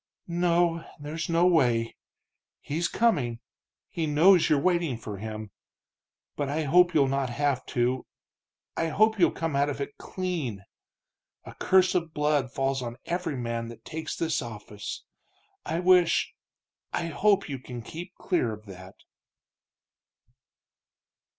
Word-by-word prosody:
"No, 170 -1 +2 0.2
there's 155 +3 -5
no 170 +1 +3
way. 120 -10 +3 0.6
He's 165 +4 -1
coming 145 - +1 0.5
he 165 -2 -3
knows 170 +4 +5
you're 150 - +4
waiting 170 -5 +1
for 105 -3 -7
him. 110 0 -6 0.8
But 145 -2 -2
I 155 +3 -1
hope 175 +4 +4
you'll 140 -3 +5
not 135 -1 0
have 140 +1 0
to 125 +1 0 0.7
I 165 - 0
hope 215 +6 +3
you'll 175 - +6
come 165 -3 -3
out 140 +1 +2
of 145 - -4
it 140 - -5
clean! 155 - -4 0.8
A - - -9
curse 185 0 +3
of 170 -4 -1
blood 150 -4 +1
falls 135 0 -1
on 120 -1 -5
every 175 -5 -2
man 115 -1 -3
that 115 -1 -12
takes 160 -1 -5
this 160 -2 0
office. 105 -3 -7 0.6
I 165 - -1
wish 180 -2 +4 0.6
I - - -1
hope, 195 +5 +2
you 135 -4 -5
can 125 -2 -8
keep 175 +8 -8
clear 145 - 0
of 105 0 -11
that." 95 -1 -11
150 Hz, 135 wpm, -27 LUFS, 120-170 Hz, 0.8 s, you'll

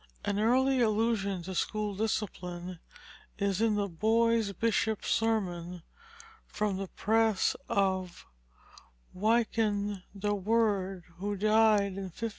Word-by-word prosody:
An 205 0 0
early 260 +4 +3
allusion 215 -4 +1
to 190 +2 -6
school 210 +3 -1
discipline 180 -4 -3 0.6
is 200 0 0
in 225 -2 +3
the 205 -1 0
Boy 225 +6 +2
Bishop's 220 +1 0
Sermon 180 -6 -1 0.6
from 210 -3 -2
the 195 0 -4
press 220 +1 +1
of 190 -2 -1 0.9
Wynkyn 210 -1 +1 0.2
de 205 +1 0
Worde, 200 -3 0
who 205 +3 -3
died 215 -1 +3
in 195 -1 -5
1535. 230 +6 -4
205 Hz, 110 wpm, -30 LUFS, 190-225 Hz, 0.9 s, early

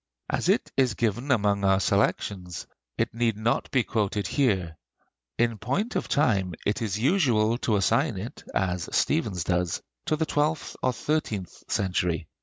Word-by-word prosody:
As - - 0
it - - +2
is 130 -5 +2
given 120 +5 -1
among 100 -5 +2
our 95 -1 +4
selections, 95 -4 0 0.3
it 115 +1 0
need 115 -2 0
not 115 +2 0
be 130 -3 +2
quoted 105 -3 -1
here. 95 - +1 0.6
In 115 -2 +1
point 200 - -1
of - - -1
time 100 - +1
it 105 - 0
is 105 -3 -1
usual 120 - +2
to 110 - +1
assign 100 -2 +2
it, - - -7
as 90 -3 0
Stephens 90 -2 +1
does, 90 -1 0 0.3
to - - +2
the 160 +1 0
twelfth 150 +1 -1
or 130 - +2
thirteenth 115 - -2 0.2
century. 90 -4 0
105 Hz, 155 wpm, -26 LUFS, 95-125 Hz, 0.6 s, our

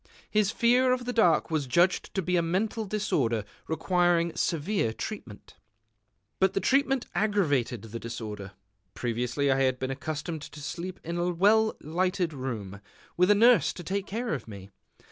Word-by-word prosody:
His 210 -2 +3
fear 245 +3 +3
of 250 -1 -3
the 245 - -2
dark 175 -9 +3
was 150 -4 0
judged 175 +8 +2
to 190 - 0
be 180 +2 0
a 175 - +3
mental 205 +6 -1
disorder 135 - 0 0.2
requiring 170 +1 +1
severe 165 - 0
treatment. 120 - -8 0.8
But 190 - +3
the - - +3
treatment 270 +2 +2
aggravated 160 - +1
the 115 +1 -7
disorder. 110 -4 -6 0.4
Previously 125 +4 -1
I 135 0 +2
had 130 -1 +2
been 130 +1 -3
accustomed 155 +3 -4
to 145 - -10
sleep 180 +5 -6
in 170 +1 -3
a 175 +1 +1
well 210 +5 +3
lighted 180 +2 -1
room, 110 -8 -5 0.3
with 180 +2 +3
a 205 - +7
nurse 235 +3 +5
to 175 - -9
take 195 +3 -3
care 230 -1 -2
of 130 -7 -5
me. 100 -2 -10
170 Hz, 165 wpm, -28 LUFS, 130-200 Hz, 0.8 s, a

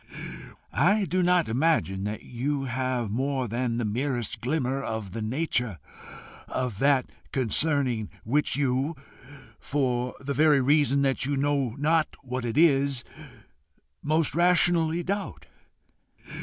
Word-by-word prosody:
I 200 +8 +3
do 185 +2 0
not 180 -1 +3
imagine 115 - +1
that 105 +1 -4
you 135 +3 -2
have 130 -3 -2
more 130 +2 -1
than 120 +1 -1
the 120 - -1
merest 120 +1 -2
glimmer 135 0 -1
of 110 -7 -5
the 115 - -4
nature 125 - -1 0.7
of 125 -6 -3
that 140 -2 +2 0.2
concerning 130 -2 +1
which 145 +7 +1
you, 140 +3 0 0.6
for 125 -3 -1
the 140 +1 -3
very 150 0 +4
reason 140 +1 +3
that 135 -1 +1
you 140 -1 0
know 140 -4 0
not 155 +2 +1
what 125 -1 -4
it 115 +2 -3
is, 140 -5 +3 1.0
most 155 -1 +1
rationally 175 0 +3
doubt. 200 +3 -4
135 Hz, 125 wpm, -26 LUFS, 120-150 Hz, 1.0 s, very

